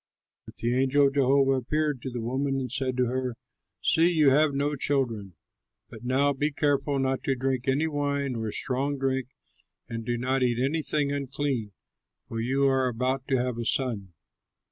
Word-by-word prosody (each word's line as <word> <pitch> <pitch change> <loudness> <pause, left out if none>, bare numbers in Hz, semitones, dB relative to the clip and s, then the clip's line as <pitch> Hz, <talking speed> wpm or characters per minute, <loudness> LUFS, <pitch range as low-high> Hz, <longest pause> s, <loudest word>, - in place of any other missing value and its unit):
But - - -11
the 120 +2 -1
angel 135 +2 +3
of - - -12
Jehovah 135 0 +3
appeared 150 +1 -1
to 130 - -4
the 120 -1 -5
woman 135 +3 -1
and 130 -2 -3
said 130 -1 -1
to 125 - +3
her, 125 0 -2 0.5
"See, 165 +2 +4
you 155 -5 +4
have 150 +2 +4
no 145 +1 0
children; 120 - -1 0.6
but - - -11
now 135 +3 +2
be 145 +2 0
careful 140 0 +1
not 135 0 0
to 135 - +1
drink 130 0 -2
any 135 +4 +2
wine 145 -2 -1
nor 110 -3 -3
strong 135 +5 -1
drink, 130 -1 -1 0.6
and 115 -1 -5
do 120 +1 -1
not 130 +2 0
eat 120 -2 +2
anything 145 +2 0
unclean, 135 -6 -2 0.5
for 115 - -5
you 135 +4 +1
are 135 -1 +3
about 130 +2 -1
to 135 - +2
have 125 -1 -2
a - - -2
son. 115 -7 -1
135 Hz, 180 wpm, -27 LUFS, 125-140 Hz, 0.6 s, See